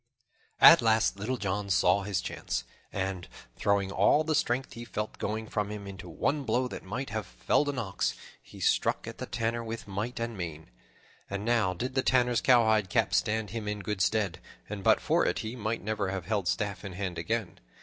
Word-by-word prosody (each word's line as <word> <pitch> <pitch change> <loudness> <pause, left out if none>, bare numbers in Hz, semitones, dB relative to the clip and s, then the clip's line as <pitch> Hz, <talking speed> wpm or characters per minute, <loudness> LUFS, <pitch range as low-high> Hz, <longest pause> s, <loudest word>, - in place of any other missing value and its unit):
At - - +10
last 110 -3 +2
Little 125 +6 -2
John 100 -1 -2
saw 90 +1 +4
his 95 -2 -1
chance, - - -3 0.3
and, 95 -2 -3 0.3
throwing 100 -1 +1
all 100 +11 +4
the 155 0 0
strength 130 -2 0
he 120 - -7
felt 105 -2 -5
going 110 +1 -2
from 105 -2 -2
him 105 -1 -6
into 95 -2 -8
one 140 - 0
blow 125 +1 +1
that - - -6
might 115 +6 -5
have 110 -3 -3
felled 145 - +1
an 140 - -3
ox, 105 -7 -1 0.3
he - - -14
struck - - +1
at - - -8
the - - -4
Tanner 115 0 -1
with 115 -1 -6
might 105 +6 -3
and 115 0 -3
main. 80 -4 -6 0.6
And 100 +1 -4
now 115 -6 +2
did 125 +8 -3
the 130 - +2
Tanner's 125 -2 +3
cowhide 110 -5 +4
cap - - +1
stand 110 -2 +1
him 110 -2 -4
in 105 0 -2
good 100 0 -3
stead, 100 -5 +1 0.3
and 100 -2 -6
but - - +5
for - - +2
it - - +1
he 110 +3 -4
might 110 -4 -3
never 105 -2 -1
have 95 -2 -4
held 100 -3 -1
staff 100 +3 -1
in 100 -2 -6
hand 90 -2 -4
again. 110 +2 -2
105 Hz, 200 wpm, -29 LUFS, 95-115 Hz, 0.6 s, At